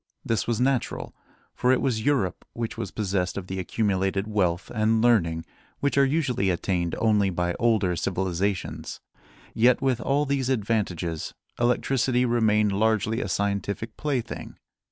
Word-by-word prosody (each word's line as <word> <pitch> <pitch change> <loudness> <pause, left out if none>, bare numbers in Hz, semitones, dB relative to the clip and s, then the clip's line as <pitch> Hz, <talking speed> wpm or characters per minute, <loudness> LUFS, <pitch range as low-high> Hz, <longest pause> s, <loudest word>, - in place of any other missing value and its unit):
This 115 - 0
was 120 -1 0
natural, 130 -1 0 0.4
for 125 - +2
it 130 - +3
was 120 -5 0
Europe 130 -10 0
which 115 -1 -4
was - - -4
possessed 95 -4 -1
of 95 - -4
the 95 0 -4
accumulated 95 0 0
wealth 95 -5 0
and 110 0 +2
learning 85 -9 +2 0.3
which 140 - 0
are 140 - +5
usually 135 -9 +1
attained 85 -1 -1
only 105 -3 +3
by 90 -1 -1
older 105 -7 +2
civilizations. 95 +2 -2 0.5
Yet, 120 +2 +4
with 130 -4 0
all 145 +2 +1
these 135 -2 0
advantages, 100 -9 -1 0.2
electricity 125 +1 +2
remained 110 -3 +3
largely 110 +3 +1
a 100 - -3
scientific 100 +3 -2
plaything. 135 -6 -3
110 Hz, 140 wpm, -26 LUFS, 95-120 Hz, 0.5 s, are